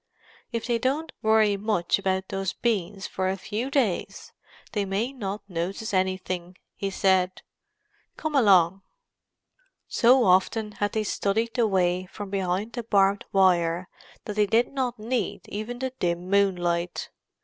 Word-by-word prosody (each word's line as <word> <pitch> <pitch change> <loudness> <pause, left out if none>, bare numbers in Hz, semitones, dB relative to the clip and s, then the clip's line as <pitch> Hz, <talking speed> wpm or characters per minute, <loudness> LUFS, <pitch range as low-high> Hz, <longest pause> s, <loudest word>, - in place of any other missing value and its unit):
"If 230 -2 -3
they 235 -2 0
don't 280 +7 -1
worry 215 -2 +4
much 200 -4 +1
about 190 -1 -1
those 195 -1 -2
beans 200 -4 -1
for 185 0 -2
a 190 - -1
few 220 +7 -3
days 255 -10 -1 0.4
they 205 - 0
may 200 +7 -2
not 205 -5 -5
notice 190 +5 -3
anything," 185 -1 -1 0.2
he 195 - -2
said. 190 -1 +1 0.7
"Come 315 -1 -3
along." 195 - +5 1.1
So 250 +1 +5
often 200 +4 +2
had 205 -1 -2
they 220 - 0
studied 220 +3 -1
the 240 -3 +2
way 185 -2 +1
from 200 +1 -8
behind 195 +3 -1
the 240 - -3
barbed 200 -3 +2
wire 180 -2 +3 0.4
that 210 - -5
they 210 -1 +4
did 230 +5 +2
not 255 -3 -1
need 225 -1 -3
even 215 +4 -5
the 260 +1 -3
dim 175 0 -1
moonlight. 175 -3 +1
200 Hz, 145 wpm, -26 LUFS, 185-225 Hz, 1.1 s, along